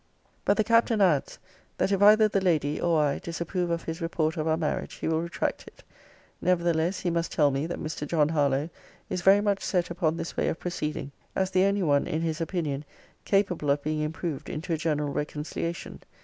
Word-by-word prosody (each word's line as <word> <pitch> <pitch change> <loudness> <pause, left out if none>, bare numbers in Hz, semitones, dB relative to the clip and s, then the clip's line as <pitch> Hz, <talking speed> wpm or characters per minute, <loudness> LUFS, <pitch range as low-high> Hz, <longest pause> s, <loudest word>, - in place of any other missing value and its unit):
But 200 - +3
the 215 - +3
Captain 230 0 +3
adds, 175 -8 +2 0.4
'that - - +1
if 195 -1 +1
either 215 +1 +7
the 200 -2 0
lady 155 -5 +1
or 170 -2 +2
I 140 -1 0
disapprove 170 +1 -3
of 170 0 -1
his 165 +2 -5
report 160 -1 0
of 155 0 -2
our 160 0 +2
marriage, 155 -2 -2
he - - -4
will 160 0 +1
retract 170 0 -3
it. - - -15 0.6
Nevertheless, 170 0 +1
he 175 - 0
must 170 0 -1
tell 145 -2 +3
me, 135 +4 -1
that 175 - -4
Mr. 150 -1 -5
John 150 -1 +2
Harlowe 145 0 +1 0.4
is 180 - -1
very 195 +3 +6
much 205 -1 0
set 175 -2 0
upon 165 -2 0
this 165 0 -5
way - - 0
of - - -2
proceeding; 155 -5 -4 0.2
as 190 0 0
the 185 +1 +4
only 200 0 +1
one, 145 -3 +2
in 155 - -1
his 165 0 -2
opinion, 155 -5 -2 0.4
capable 185 -7 +1
of 140 0 +2
being 155 0 -1
improved 155 -1 -4
into 165 +2 -3
a - - +3
general 150 -2 -1
reconciliation. 150 +3 -4
165 Hz, 205 wpm, -27 LUFS, 150-180 Hz, 0.6 s, either